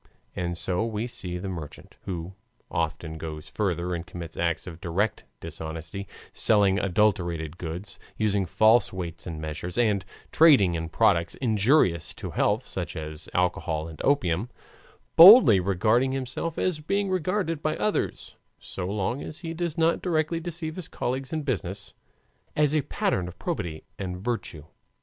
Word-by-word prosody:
And 85 Hz, -1 st, -2 dB
so 90 Hz, +4 st, -1 dB
we 115 Hz, 0 st, -2 dB
see 90 Hz, -7 st, -5 dB
the 95 Hz, +2 st, -5 dB
merchant 85 Hz, -6 st, -7 dB
(who 90 Hz, 0 st, -5 dB, 0.4 s
often 80 Hz, 0 st, -2 dB
goes 75 Hz, -1 st, -6 dB
further 90 Hz, -4 st, -1 dB
and 85 Hz, -1 st, -3 dB
commits 85 Hz, -2 st, -8 dB
acts 85 Hz, -1 st, -1 dB
of 85 Hz, -2 st, -9 dB
direct 100 Hz, +5 st, -1 dB
dishonesty, 80 Hz, +4 st, -6 dB, 0.3 s
selling 100 Hz, -3 st, +3 dB
adulterated 90 Hz, -5 st, 0 dB
goods, 90 Hz, +4 st, -6 dB, 0.2 s
using 100 Hz, -3 st, +1 dB
false 110 Hz, +4 st, +4 dB
weights 85 Hz, -3 st, -6 dB
and 80 Hz, -3 st, -5 dB
measures, 80 Hz, +3 st, -5 dB
and 105 Hz, -5 st, +2 dB, 0.3 s
trading 140 Hz, -, +6 dB
in 80 Hz, -1 st, -3 dB
products 85 Hz, +1 st, +2 dB
injurious 110 Hz, -, +2 dB
to -, -, -6 dB
health, -, -, +1 dB
such -, -, -5 dB
as 75 Hz, 0 st, -6 dB
alcohol 80 Hz, -3 st, 0 dB
and 80 Hz, -2 st, -9 dB
opium) 100 Hz, -, +1 dB, 0.7 s
boldly 180 Hz, -, +10 dB
regarding 110 Hz, +8 st, +2 dB
himself 135 Hz, +5 st, -3 dB
and 155 Hz, -4 st, -1 dB
being 200 Hz, -1 st, 0 dB
regarded 185 Hz, -2 st, -1 dB
by 155 Hz, -1 st, -1 dB
others, 215 Hz, -, -2 dB, 0.2 s
so 90 Hz, -2 st, -6 dB
long 105 Hz, +6 st, -2 dB
as 155 Hz, +3 st, -8 dB
he 165 Hz, -2 st, -4 dB
does 170 Hz, -1 st, -3 dB
not 165 Hz, 0 st, +2 dB
directly 165 Hz, -1 st, 0 dB
deceive 165 Hz, -1 st, -5 dB
his 180 Hz, -, -6 dB
colleagues 130 Hz, +2 st, -3 dB
in 155 Hz, -2 st, -2 dB
business, 100 Hz, -, -3 dB, 0.6 s
as 150 Hz, -1 st, +3 dB
a 155 Hz, -, +3 dB
pattern 90 Hz, -8 st, -1 dB
of 90 Hz, -, -10 dB
probity 80 Hz, -2 st, -4 dB, 0.2 s
and 90 Hz, -2 st, -4 dB
virtue. 95 Hz, -7 st, -4 dB
100 Hz, 150 wpm, -26 LUFS, 85-135 Hz, 0.7 s, boldly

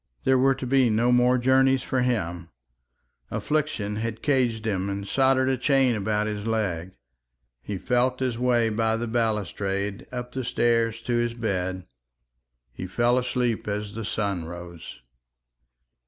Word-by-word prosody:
There 130 Hz, -1 st, +3 dB
were 135 Hz, +1 st, +4 dB
to 135 Hz, -, -6 dB
be 130 Hz, -1 st, +3 dB
no 115 Hz, +3 st, +2 dB
more 125 Hz, +1 st, +4 dB
journeys 130 Hz, +1 st, +3 dB
for 130 Hz, -, 0 dB
him; 90 Hz, -9 st, -1 dB, 0.8 s
affliction 140 Hz, -9 st, -1 dB
had 115 Hz, 0 st, -4 dB
caged 125 Hz, -6 st, +1 dB
him 100 Hz, -3 st, -1 dB
and 100 Hz, 0 st, -4 dB
soldered 130 Hz, +1 st, +3 dB
a 130 Hz, 0 st, +1 dB
chain 135 Hz, -1 st, +3 dB
about 105 Hz, 0 st, 0 dB
his 105 Hz, 0 st, -4 dB
leg. 95 Hz, -6 st, -2 dB, 0.7 s
He 100 Hz, +8 st, -5 dB
felt 125 Hz, +5 st, +1 dB
his 130 Hz, -3 st, -1 dB
way 120 Hz, -1 st, +2 dB
by 110 Hz, +1 st, 0 dB
the 120 Hz, -, -2 dB
balustrade 105 Hz, -3 st, -2 dB
up 125 Hz, -1 st, -5 dB
the 130 Hz, 0 st, -4 dB
stairs 115 Hz, -2 st, +1 dB
to 120 Hz, 0 st, -1 dB
his 120 Hz, 0 st, 0 dB
bed. 95 Hz, -5 st, -2 dB, 0.9 s
He 90 Hz, -, -6 dB
fell 120 Hz, +6 st, +2 dB
asleep 125 Hz, -3 st, -1 dB
as 105 Hz, 0 st, -3 dB
the 115 Hz, +1 st, -5 dB
sun 100 Hz, -5 st, -2 dB
rose. 85 Hz, 0 st, -9 dB
115 Hz, 150 wpm, -25 LUFS, 100-125 Hz, 0.9 s, were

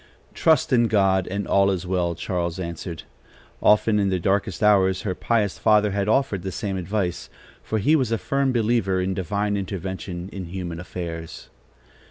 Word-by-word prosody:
"Trust 160 Hz, -4 st, +2 dB
in 120 Hz, -2 st, +4 dB
God, 95 Hz, -3 st, +2 dB
and 100 Hz, +2 st, -3 dB
all 100 Hz, 0 st, +4 dB
is 95 Hz, -2 st, -2 dB
well!" 90 Hz, -2 st, 0 dB
Charles 85 Hz, 0 st, -3 dB
answered. 85 Hz, -1 st, -6 dB, 0.6 s
Often, 105 Hz, 0 st, +4 dB
in 100 Hz, -1 st, +1 dB
their 95 Hz, -, +1 dB
darkest 95 Hz, +2 st, -1 dB
hours, 95 Hz, -2 st, +4 dB
her 100 Hz, -4 st, -1 dB
pious 105 Hz, 0 st, 0 dB
father 105 Hz, -1 st, +4 dB
had 100 Hz, 0 st, -1 dB
offered 110 Hz, -4 st, +1 dB
the 95 Hz, +1 st, -4 dB
same 100 Hz, +1 st, -3 dB
advice, 95 Hz, -1 st, -2 dB, 0.3 s
for 110 Hz, -, -2 dB
he 145 Hz, +10 st, +3 dB
was 130 Hz, -7 st, +1 dB
a 115 Hz, -, +2 dB
firm 135 Hz, +3 st, 0 dB
believer 110 Hz, -5 st, +1 dB
in 95 Hz, +1 st, -1 dB
divine 100 Hz, +3 st, -1 dB
intervention 95 Hz, -2 st, -5 dB
in 95 Hz, -2 st, -5 dB
human 85 Hz, -1 st, -5 dB
affairs. 85 Hz, -2 st, -7 dB
95 Hz, 170 wpm, -23 LUFS, 90-105 Hz, 0.6 s, in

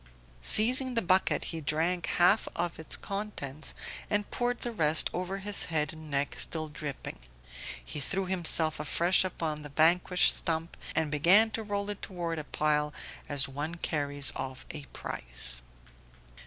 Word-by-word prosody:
Seizing 250 Hz, -, +4 dB
the 230 Hz, -, +2 dB
bucket 185 Hz, +1 st, +2 dB
he 165 Hz, -, -5 dB
drank 165 Hz, +4 st, -1 dB
half 180 Hz, +5 st, +3 dB, 0.3 s
its 160 Hz, -, -1 dB
contents 195 Hz, -8 st, -4 dB, 0.3 s
and 205 Hz, 0 st, -1 dB
poured 245 Hz, 0 st, -1 dB
the 240 Hz, -, -3 dB
rest 160 Hz, -7 st, +3 dB
over 185 Hz, +2 st, -3 dB
his 200 Hz, +1 st, +2 dB
head 155 Hz, -2 st, -1 dB
and 155 Hz, -1 st, -11 dB
neck; 140 Hz, 0 st, -2 dB
still 155 Hz, -1 st, 0 dB
dripping, 145 Hz, -, -7 dB, 0.7 s
he 150 Hz, -, -5 dB
threw 195 Hz, +7 st, -2 dB
himself 165 Hz, -4 st, +4 dB
afresh 170 Hz, +5 st, +2 dB
upon 160 Hz, -4 st, -3 dB
the 150 Hz, -, -9 dB
vanquished 170 Hz, +5 st, +3 dB
stump 165 Hz, 0 st, -3 dB, 0.2 s
and 160 Hz, -2 st, +1 dB
began 185 Hz, +9 st, +5 dB
to 225 Hz, -, -3 dB
roll 205 Hz, -1 st, -3 dB
it 205 Hz, -, -9 dB
toward 170 Hz, -3 st, -4 dB
a -, -, -5 dB
pile 150 Hz, 0 st, 0 dB, 0.4 s
as 140 Hz, -1 st, +4 dB
one 145 Hz, +5 st, -5 dB
carries 145 Hz, -4 st, -1 dB
off 130 Hz, -1 st, -6 dB
a 150 Hz, -3 st, -8 dB
prize. -, -, -1 dB
160 Hz, 150 wpm, -29 LUFS, 150-190 Hz, 0.7 s, began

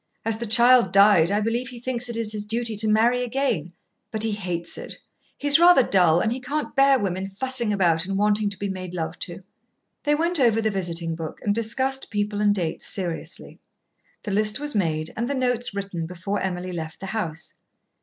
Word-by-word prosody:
As 225 Hz, -1 st, 0 dB
the 235 Hz, -, -4 dB
child 235 Hz, -2 st, +5 dB
died, 195 Hz, -4 st, +6 dB
I 205 Hz, +1 st, +1 dB
believe 235 Hz, +3 st, -1 dB
he 245 Hz, -2 st, -9 dB
thinks 245 Hz, 0 st, -2 dB
it 235 Hz, -, -3 dB
his 215 Hz, -2 st, -2 dB
duty 225 Hz, +1 st, -2 dB
to 215 Hz, +1 st, +2 dB
marry 235 Hz, +3 st, +3 dB
again. 235 Hz, -, -1 dB, 0.4 s
But 220 Hz, -1 st, 0 dB
he 225 Hz, -, 0 dB
hates 180 Hz, -5 st, -3 dB
it. -, -, -8 dB, 0.4 s
He's 290 Hz, +1 st, +4 dB
rather 345 Hz, -6 st, +7 dB
dull, 175 Hz, -6 st, +4 dB
and 220 Hz, -, 0 dB
he 250 Hz, -, -2 dB
can't 290 Hz, +5 st, -4 dB
bear 275 Hz, 0 st, +5 dB
women 190 Hz, -3 st, -2 dB
fussing 240 Hz, +3 st, -1 dB
about 175 Hz, -3 st, +1 dB
and 195 Hz, 0 st, -2 dB
wanting 210 Hz, 0 st, +2 dB
to 200 Hz, -, -7 dB
be 200 Hz, -, -3 dB
made 185 Hz, -2 st, -6 dB
love 160 Hz, 0 st, -4 dB
to." 175 Hz, +2 st, -6 dB, 0.6 s
They 295 Hz, -1 st, +2 dB
went 335 Hz, +2 st, 0 dB
over 230 Hz, -4 st, +4 dB
the 220 Hz, -1 st, 0 dB
visiting 170 Hz, -3 st, -2 dB
book 160 Hz, -1 st, -7 dB
and 205 Hz, -, +1 dB
discussed 260 Hz, +5 st, -1 dB
people 205 Hz, 0 st, -2 dB
and 205 Hz, -1 st, +3 dB
dates 170 Hz, -5 st, -2 dB
seriously. 175 Hz, -4 st, -5 dB, 0.6 s
The 205 Hz, -, -4 dB
list 215 Hz, +3 st, +1 dB
was 295 Hz, 0 st, -2 dB
made 160 Hz, -6 st, -1 dB
and 235 Hz, +3 st, -2 dB
the 280 Hz, -, -1 dB
notes 245 Hz, -4 st, -1 dB
written 195 Hz, -5 st, -4 dB
before 185 Hz, +4 st, -4 dB
Emily 180 Hz, -1 st, -3 dB
left 160 Hz, -2 st, -6 dB
the 195 Hz, -, -7 dB
house. 165 Hz, -8 st, -4 dB
210 Hz, 200 wpm, -24 LUFS, 185-240 Hz, 0.6 s, rather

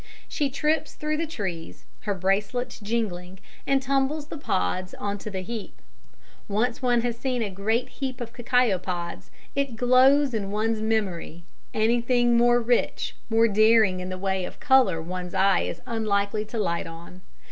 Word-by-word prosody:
She 290 Hz, -3 st, -1 dB
trips 300 Hz, +4 st, 0 dB
through 305 Hz, 0 st, -2 dB
the 330 Hz, +1 st, -2 dB
trees, 190 Hz, -, -6 dB, 0.2 s
her 200 Hz, -, +1 dB
bracelets 200 Hz, +7 st, -1 dB
jingling, 200 Hz, -5 st, -3 dB, 0.3 s
and 270 Hz, -1 st, +2 dB
tumbles 275 Hz, +3 st, 0 dB
the -, -, -6 dB
pods 185 Hz, -, -1 dB
on 205 Hz, 0 st, -3 dB
to 215 Hz, -, -6 dB
the 190 Hz, -2 st, -4 dB
heap. 225 Hz, +2 st, -7 dB, 0.7 s
Once 225 Hz, +4 st, 0 dB
one 245 Hz, -2 st, +3 dB
has 240 Hz, -1 st, -1 dB
seen 250 Hz, 0 st, -1 dB
a 205 Hz, -, -3 dB
great 220 Hz, +6 st, 0 dB
heap 260 Hz, -2 st, -5 dB
of 235 Hz, -1 st, -6 dB
cacao 240 Hz, -5 st, +2 dB
pods 175 Hz, -1 st, -5 dB, 0.2 s
it 275 Hz, -4 st, -1 dB
glows 255 Hz, +3 st, +5 dB
in 205 Hz, -3 st, -2 dB
one's 215 Hz, +2 st, 0 dB
memory: 195 Hz, -6 st, -2 dB, 0.3 s
anything 240 Hz, +2 st, +2 dB
more 240 Hz, +1 st, +5 dB
rich, 240 Hz, 0 st, 0 dB
more 225 Hz, 0 st, +4 dB
daring 215 Hz, -2 st, +4 dB
in 180 Hz, 0 st, -5 dB
the 185 Hz, -, -4 dB
way 190 Hz, 0 st, -1 dB
of -, -, -7 dB
colour 260 Hz, -, +4 dB
one's 180 Hz, +2 st, -5 dB
eye 195 Hz, 0 st, +4 dB
is 170 Hz, -, -4 dB
unlikely 210 Hz, -2 st, 0 dB
to 225 Hz, -, -6 dB
light 170 Hz, -5 st, -1 dB
on. 170 Hz, +2 st, -11 dB
220 Hz, 165 wpm, -25 LUFS, 190-245 Hz, 0.7 s, glows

